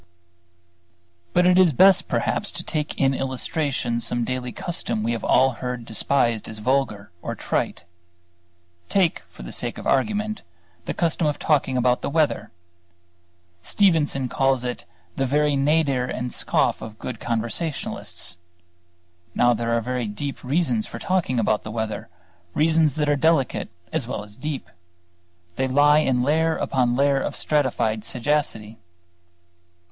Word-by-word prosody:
But 180 - +3
it 180 0 +5
is 175 -5 +5
best 190 +7 +5
perhaps - - -1
to - - -5
take 150 -2 -3
in 135 0 +3
illustration 130 -2 -2
some 120 0 -1
daily 125 0 -3
custom 120 -11 -3
we 115 - 0
have 115 -2 -3
all 130 0 +4
heard 125 -2 -4
despised 115 0 +1
as 110 - -5
vulgar 105 -4 -1
or - - -4
trite. - - -2 1.1
Take, 185 -5 +2
for - - -12
the - - -7
sake - - -3
of - - -8
argument, 215 +8 0 0.4
the - - -3
custom 165 -1 +1
of 150 - 0
talking 135 -4 +1
about 125 0 +2
the - - -2
weather. 145 -8 +1 1.1
Stevenson 155 - +2
calls 135 0 +1
it 125 -1 -4 0.3
"the 135 - +1
very 150 +2 +2
nadir 140 -2 +2
and 125 0 -4
scoff - - +1
of 110 -1 -8
good 120 -1 -6
conversationalists." 115 - -3 1.0
Now 120 0 +4
there 115 0 -2
are - - 0
very 125 0 -2
deep 135 +7 -5
reasons 130 -5 0
for - - -7
talking 180 -9 0
about 110 -2 +1
the - - -7
weather, 110 -4 -4 0.5
reasons 155 -2 +3
that 150 -1 0
are 145 - +3
delicate 145 -2 +1 0.2
as - - -1
well 125 -5 -4
as 105 0 -13
deep; 135 - -5 0.9
they 130 +1 +1
lie 145 +3 +5
in 130 -5 +1
layer 160 +3 +2
upon 125 -2 +1
layer 140 +1 +3
of - - -3
stratified 125 -7 0
sagacity. 115 -4 -2
130 Hz, 145 wpm, -23 LUFS, 120-150 Hz, 1.1 s, it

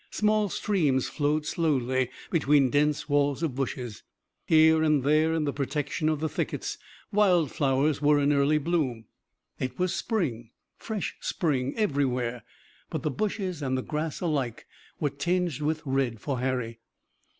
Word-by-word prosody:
Small 215 -1 +1
streams 155 -12 +1
flowed 150 +1 0
slowly 130 -6 0 0.2
between 145 -5 +3
dense 150 0 +1
walls 145 0 +1
of 155 -6 0
bushes. 125 -4 -4 0.5
Here 160 0 +6
and 155 -4 +3
there 155 +3 +3
in 160 - 0
the 145 -2 -1
protection 150 +2 -1
of 155 -2 0
the 160 - +1
thickets - - -3 0.3
wild 185 - +3
flowers 140 +1 +1
were 145 0 +4
in 145 +1 +3
early 140 +2 +3
bloom. 145 -8 -1 0.5
It 130 0 -3
was 185 0 0
spring, 130 - -2 0.3
fresh 215 -4 -4
spring 140 -7 -1
everywhere, 130 - 0 0.5
but - - -4
the 155 - 0
bushes 190 - -2
and 130 -2 0
the 130 - -3
grass 155 0 -3
alike 140 -9 -2 0.3
were 145 - 0
tinged 170 +1 -1
with 155 +1 -1
red 130 -4 0
for 135 0 -3
Harry. 125 -3 -2
145 Hz, 150 wpm, -27 LUFS, 130-160 Hz, 0.5 s, Here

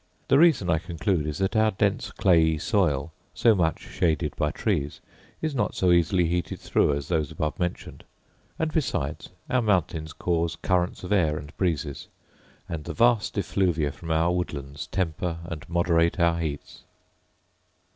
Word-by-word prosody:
The 135 - +5
reason, 160 - +4
I 80 -2 +2
conclude, 85 -1 -1
is, 75 - -3
that 95 +2 -1
our 110 0 +4
dense 100 -1 0
clayey 80 -4 +3
soil, 80 -5 0 0.2
so 115 - +5
much 85 -5 0
shaded 80 -4 -1
by 75 - 0
trees, 75 -5 -2 0.4
is 155 -2 0
not 130 - -1
so 90 -1 +2
easily 85 +1 +3
heated 85 +1 -2
through 75 - +2
as 70 -1 -5
those 80 -4 0
above 75 -1 -3
mentioned: 90 -1 -4 0.5
and, 160 -1 -1
besides, 90 - -2 0.2
our 130 - +1
mountains 85 -7 0
cause 85 -1 -1
currents 90 -1 -1
of 90 - -6
air 80 -7 +2
and 70 -1 -9
breezes; 80 -6 -2 0.6
and 80 -3 -5
the - - -5
vast 115 -2 +2
effluvia 85 -5 0
from 80 +3 -10
our 80 +2 +2
woodlands 70 -5 -4
temper 85 -2 -2
and 85 -3 -7
moderate 85 0 +2
our 85 0 +3
heats. 75 -3 -5
85 Hz, 155 wpm, -26 LUFS, 80-95 Hz, 0.6 s, The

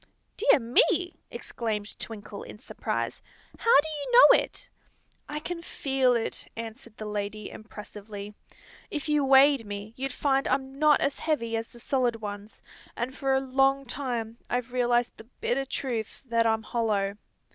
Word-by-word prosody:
_" - - -21 0.3
"Dear - - +5
me!" 355 - +2
exclaimed 215 -3 -4
Twinkle, 210 -2 -7
in - - -9
surprise. - - -3 0.4
"How 460 -10 +6
do 315 - -7
you 310 +8 -4 0.2
know - - +6
it?" - - -10 0.6
"I 300 0 -3
can 335 +2 -5
feel 265 -6 +1
it," 230 - -2
answered 230 0 -8
the 215 - -6
lady, 210 0 -4
impressively. 210 -1 -9 0.6
"If 295 0 -4
you 300 -1 +2
weighed 270 -1 +6
me 205 +1 -7
you'd 270 +1 -3
find 270 +1 +1
I'm 265 +1 -1
not 305 -1 +5
as 275 - 0
heavy 235 -8 -1
as 225 0 -2
the 240 - -16
solid 245 -1 +1
ones, 205 -1 -8 0.3
and 250 +2 -3
Tor 270 -1 +1
a - - +4
long 270 +1 +2
time 235 -3 -3
I 245 - +2
Ve 250 +1 -20
realized 245 -1 +1
the 220 - -12
bitter 270 +3 0
truth 240 -5 -4
that 230 -2 +2
I'm 220 0 +1
hollow. 210 -4 0
245 Hz, 165 wpm, -28 LUFS, 220-275 Hz, 0.6 s, How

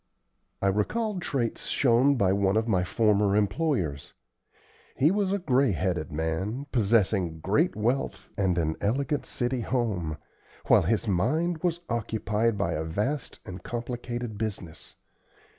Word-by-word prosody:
I - - +3
recalled 195 - -1
traits 125 -8 -2
shown 130 +2 +3
by 95 -6 +2
one 100 +1 +2
of 110 +1 +1
my 95 -5 +2
former 105 0 +2
employers. 105 - 0 0.8
He 150 +5 +4
was 200 -1 +1
a 200 - +2
gray 135 - +2
headed 85 0 -1
man, 80 - -2
possessing 100 -7 +2
great 125 - +1
wealth 120 +6 -1
and 95 -4 +1
an 80 -2 0
elegant 140 +8 0
city 120 0 -1
home, 100 -11 -1 0.5
while - - +6
his 110 +5 0
mind 160 - +1
was 175 0 -1
occupied 110 -1 0
by 100 - 0
a 80 - -2
vast 105 - -2
and 90 -1 -8
complicated 120 -1 -5
business. 100 -7 -5
110 Hz, 135 wpm, -27 LUFS, 95-130 Hz, 0.8 s, while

